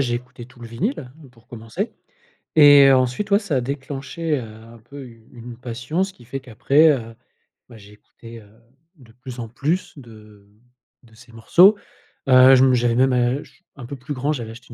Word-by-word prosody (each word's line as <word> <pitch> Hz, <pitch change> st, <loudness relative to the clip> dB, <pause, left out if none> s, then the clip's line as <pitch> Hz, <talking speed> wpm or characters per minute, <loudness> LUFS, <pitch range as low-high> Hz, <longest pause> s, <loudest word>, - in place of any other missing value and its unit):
j'ai 120 Hz, -3 st, -1 dB
écouté 125 Hz, 0 st, -8 dB
tout 125 Hz, 0 st, -20 dB
le 120 Hz, -, -9 dB
vinyle, 175 Hz, -, -4 dB
hein, 155 Hz, -4 st, -17 dB
pour 115 Hz, -2 st, -25 dB
commencer 120 Hz, -, -6 dB, 0.6 s
et 145 Hz, -2 st, +7 dB
heu, 135 Hz, -, +5 dB
ensuite 130 Hz, +11 st, -1 dB
ouais, 200 Hz, -, +5 dB
ça 175 Hz, -11 st, -3 dB
a -, -, -1 dB
déclenché, 140 Hz, +4 st, -5 dB
heu, -, -, -7 dB
un 115 Hz, +1 st, -14 dB
peu 135 Hz, +4 st, -12 dB
une 115 Hz, -2 st, -17 dB
une 120 Hz, -1 st, -11 dB
passion, 125 Hz, +9 st, -4 dB
ce 195 Hz, -, -6 dB
qui 120 Hz, -, -19 dB
fait 135 Hz, +3 st, -6 dB
qu'après, 135 Hz, +6 st, +2 dB
heu 115 Hz, -5 st, -5 dB, 0.5 s
bah, 115 Hz, -, -14 dB
j'ai 105 Hz, 0 st, -17 dB
écouté, 115 Hz, +2 st, -15 dB
heu, 105 Hz, -, -19 dB, 0.5 s
de 120 Hz, -5 st, -19 dB
plus 125 Hz, 0 st, -11 dB
en 115 Hz, -, -6 dB
plus 170 Hz, +9 st, -3 dB
de 110 Hz, -5 st, -16 dB, 0.6 s
de 115 Hz, -1 st, -22 dB
ses 120 Hz, 0 st, -18 dB
morceaux. 175 Hz, -, +4 dB, 0.5 s
Heu, 130 Hz, +1 st, +7 dB
je 130 Hz, -, +4 dB
me 130 Hz, -, +3 dB
j'avais 120 Hz, -1 st, 0 dB
même 130 Hz, +1 st, +2 dB
ach 125 Hz, +3 st, -3 dB
un 130 Hz, -4 st, -10 dB
peu 140 Hz, -, -8 dB
plus 130 Hz, +3 st, -8 dB
grand 140 Hz, +4 st, -2 dB
j'avais 115 Hz, -5 st, -7 dB
acheté 120 Hz, +1 st, -14 dB
125 Hz, 205 wpm, -20 LUFS, 115-140 Hz, 0.6 s, et